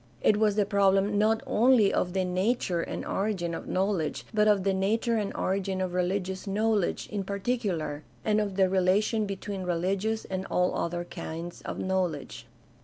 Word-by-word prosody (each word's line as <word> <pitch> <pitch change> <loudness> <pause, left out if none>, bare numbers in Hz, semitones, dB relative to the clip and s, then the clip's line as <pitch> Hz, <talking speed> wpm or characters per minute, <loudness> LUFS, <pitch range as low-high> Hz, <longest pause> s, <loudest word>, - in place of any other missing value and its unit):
It 210 - +4
was 210 -1 +2
the 210 -1 +2
problem 200 0 +3
not 220 +1 +2
only 230 -3 +4
of 180 - 0
the 190 -1 +1
nature 185 -1 0
and - - -5
origin 190 -4 -1
of - - -6
knowledge 185 -4 -1
but 210 0 +3
of 205 -3 +4
the 195 0 +2
nature 225 +5 +1
and 205 -2 -1
origin 190 0 -1
of 185 -1 -2
religious 185 +1 -1
knowl 210 0 +2
edge - - -3
in 205 -2 -2
particular, 195 -7 -2 0.2
and 215 0 +3
of 200 -2 -3
the 190 -1 +4
relation 195 +4 +2
between 195 0 -5
rehgious 190 +5 -1
and 190 0 -4
all 180 0 +1
other 175 +1 -2
kinds 170 0 -7
of - - -5
knowledge. 185 -6 -2
195 Hz, 175 wpm, -28 LUFS, 185-210 Hz, 0.2 s, It